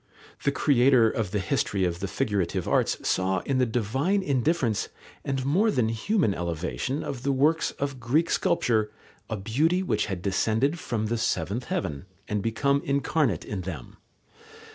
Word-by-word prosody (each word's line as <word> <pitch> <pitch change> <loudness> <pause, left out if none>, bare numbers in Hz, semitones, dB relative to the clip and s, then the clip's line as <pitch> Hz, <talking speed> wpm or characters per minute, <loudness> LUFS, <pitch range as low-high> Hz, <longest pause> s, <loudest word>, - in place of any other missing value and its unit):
The 140 - +2
creator 130 -5 +4
of 110 -5 -2
the 105 - -1
history 95 0 0
of 85 -1 -2
the 100 - -3
figurative 100 -6 -1
arts - - +2
saw 95 0 +1
in 135 -2 -1
the 125 - +3
divine 130 - 0
indifference 135 - 0 0.3
and 135 -2 -2
more 190 +11 +3
than 120 - +1
human 115 - +1
elevation 90 - -3
of 130 -3 -5
the 140 - 0
works 150 +4 +2
of 140 -2 -3
Greek 140 +8 +1
sculpture 115 - +1 0.4
a 110 - -2
beauty 150 - +1
which 185 - 0
had 95 -4 -4
descended 110 - +1
from 110 -7 -2
the 115 +1 -1
seventh 100 +4 -1
heaven 95 - -3 0.2
and 105 -1 -1
become 140 +6 +1
incarnate 140 - 0
in 100 -3 -4
them. 85 -9 -7
120 Hz, 160 wpm, -26 LUFS, 100-140 Hz, 0.4 s, creator